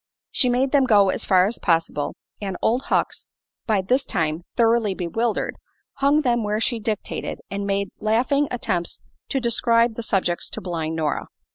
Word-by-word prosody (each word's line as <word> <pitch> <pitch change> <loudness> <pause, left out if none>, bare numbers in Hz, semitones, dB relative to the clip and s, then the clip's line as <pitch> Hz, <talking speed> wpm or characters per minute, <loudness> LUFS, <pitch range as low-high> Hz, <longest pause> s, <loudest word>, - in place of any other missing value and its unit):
She 250 - +2
made 255 +2 +1
them 280 -2 +4
go 205 -5 +5
as - - -3
far 185 -1 +5
as 220 +4 -3
possible, 165 -4 0 0.3
and 195 -3 -3
Old 245 +4 +1
Hucks, - - -1 0.4
by 210 -4 +2
this 255 +8 +2
time 160 -2 0
thoroughly 225 -4 +3
bewildered, 215 +7 -1 0.4
hung 280 +2 +3
them 240 -3 +2
where 210 +1 0
she 230 +1 0
dictated 215 -1 -3
and 200 0 -3
made 200 0 0
laughable 250 +7 +2
attempts 185 -8 -1 0.3
to 270 - 0
describe 235 -1 +2
the 235 - -5
subjects 190 -6 0
to - - -5
blind 165 -3 -3
Nora. 155 -2 -1
215 Hz, 165 wpm, -23 LUFS, 185-240 Hz, 0.4 s, go